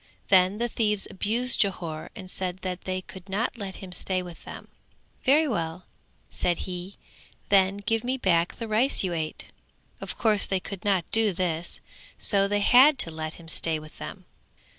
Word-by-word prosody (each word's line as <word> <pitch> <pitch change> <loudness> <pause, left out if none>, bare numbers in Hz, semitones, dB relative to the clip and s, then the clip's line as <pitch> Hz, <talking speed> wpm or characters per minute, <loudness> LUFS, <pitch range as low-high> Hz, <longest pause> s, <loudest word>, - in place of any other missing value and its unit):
Then 185 +1 +5
the 240 +2 0
thieves 210 -3 +1
abused 230 +6 0
Jhore 170 -6 -2
and 185 - -8
said 185 0 -4
that 185 -1 -4
they 185 0 -2
could 190 +1 -12
not 215 +7 -1
let 195 -2 -5
him 190 -2 -9
stay 185 0 -1
with 175 -2 -11
them: - - -9 0.6
"Very 300 +4 +5
well", 170 - -3 0.5
said 175 -1 -1
he, 180 +1 -6 0.5
"then 195 0 +4
give 215 +2 0
me 255 +2 -1
back 175 -7 +1
the 230 - -5
rice 225 +5 +3
you 180 -2 -1
ate." 160 -2 -4 0.5
Of - - -6
course 215 -3 +2
they 190 - 0
could 195 0 -8
not 195 -4 +2
do 220 -3 +3
this. 170 -2 -2 0.4
So 200 -1 +3
they 205 0 +1
had 265 +7 +7
to 165 - 0
let 155 0 -5
him 170 - -14
stay 165 -1 -1
with 155 0 -12
them. - - -8
190 Hz, 180 wpm, -26 LUFS, 175-215 Hz, 0.6 s, had